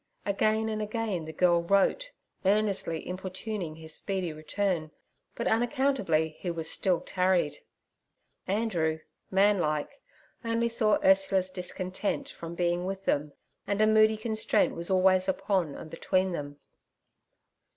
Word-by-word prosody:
Again 215 +2 +1
and 215 -1 -2
again 210 -5 -2
the 160 - -6
girl 170 +1 +3
wrote, 200 - +2 0.3
earnestly 195 -5 +1
importuning 185 -1 -5
his 160 -1 -9
speedy 185 -4 -3
return, 155 +1 -2 0.5
but - - -3
unaccountably 225 - +1
he 170 -3 -3
still 175 +2 +1
tarried. 180 -5 +1 0.9
Andrew, 175 -7 0 0.3
man 200 +1 +4
like, 155 - -2 0.7
saw 225 -3 +3
only - - -6
Ursula's 190 -1 +3
discontent 185 +2 -3
from 170 0 -8
being 175 0 0
with 195 0 -5
them, 145 0 0 0.3
and 200 0 -1
a 215 - +5
moody 215 0 +5
constraint 220 0 +1
was 170 0 -1
always 185 0 +3
upon 190 -6 0
and 160 - -9
between 185 +3 0
them. 145 -4 -5
185 Hz, 125 wpm, -29 LUFS, 170-210 Hz, 0.9 s, a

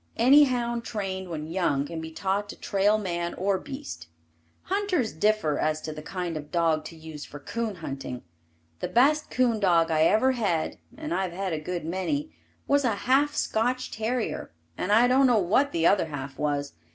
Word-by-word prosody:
Any 275 +6 +7
hound 240 -2 -1
trained 190 -4 -4
when 155 -2 -4
young 160 -5 0
can 160 +2 -6
be 160 - -6
taught 195 +5 -2
to - - -7
trail 205 +2 +2
man 175 -4 -3
or 190 0 0
beast. 270 - -8 0.6
Hunters 370 - 0
differ 160 -4 +1
as 155 0 +1
to 155 - -5
the 155 - -8
kind 175 +1 -4
of 150 -1 -6
dog 165 -3 +1
to 165 - -8
use 160 -2 -9
for 145 - -9
coon 220 +7 -3
hunting. 135 -6 -6 0.6
The - - -2
best 295 +5 +3
coon 245 -3 +2
dog 170 -4 +3
I 155 0 +4
ever 220 +9 +4
had 200 -10 -1 0.2
(and 310 +1 -4
I've 185 -2 -1
had 190 -1 -2
a 155 - -1
good 175 +1 -4
many) 190 - -2 0.3
was 285 0 +3
a 230 -5 +1
half 280 +3 +3
Scotch 245 +3 0
terrier 225 +2 -2 0.3
and 185 - -2
I 230 +4 +6
don't 265 +2 +5
know 245 -3 +4
what 215 +9 +2
the 165 0 0
other 190 -2 +4
half 140 -3 -6
was. 145 -1 -1
190 Hz, 190 wpm, -27 LUFS, 160-240 Hz, 0.6 s, Any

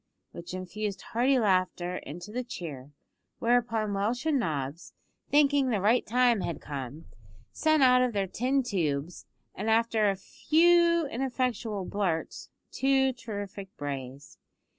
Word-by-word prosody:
which 170 +1 -8
infused 190 +2 -4
hearty 255 +4 +3
laughter 185 -4 +1
into 175 +8 -8
the 250 +3 -3
cheer, 150 - -7 0.5
whereupon 230 -3 +1
Welsh 220 +7 -1
and 305 -4 +2
Nobbs, 150 - -3 0.4
thinking 285 -2 +4
the 220 -4 +1
right 220 +6 +3
time 240 -2 +3
had 170 - -3
come, 140 +1 -7 0.5
sent 310 - +2
out 250 -1 +6
of 250 -1 +2
their 200 -3 0
tin 255 +8 0
tubes, 170 - -2 0.3
after 220 0 +2
a 195 - 0
few 335 - +3
ineffectual 245 -6 -2
blurts, 180 -6 -2 0.2
two 265 -1 +2
terrific 205 -4 -7
brays. 140 -1 -7
215 Hz, 125 wpm, -28 LUFS, 180-250 Hz, 0.5 s, out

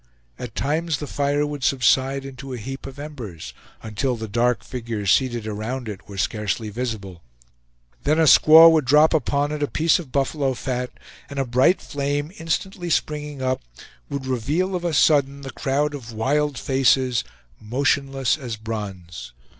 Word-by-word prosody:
At 120 -2 -7
times 155 +3 0
the 150 - -5
fire 145 +1 0
would 145 -2 -5
subside 135 +1 +2
into 135 0 -8
a - - -4
heap 135 +5 -7
of 135 0 -10
embers, 130 - -8 0.3
until 115 +4 -1
the 110 -1 -6
dark 120 +3 +1
figures 115 -6 -3
seated 120 -3 +1
around 110 +4 -4
it 105 -1 -8
were 100 - -8
scarcely 105 +2 -2
visible; 105 -7 -5 0.8
then 155 +2 +1
a 165 - +4
squaw 160 +2 +8
would 155 -4 +2
drop 150 +5 +5
upon 145 0 +1
it 150 -1 -4
a 145 - +1
piece 160 +4 +2
of 155 -7 -9
buffalo 140 -1 0
fat, 125 0 -3 0.4
and 140 - -8
a 135 - 0
bright 130 +9 +3
flame, 145 +2 -2
instantly 175 +2 -3
springing 150 -3 -2
up, 130 0 0 0.5
would 140 -1 -4
reveal 145 - -1
of 175 - -3
a 170 - 0
sudden 140 -2 +3
the 135 -1 -7
crowd 145 +3 -1
of 125 -5 -8
wild 140 +5 0
faces, 130 -3 +2 0.4
motionless 135 +4 0
as 120 -5 -5
bronze. 95 - -7
135 Hz, 160 wpm, -23 LUFS, 115-145 Hz, 0.8 s, squaw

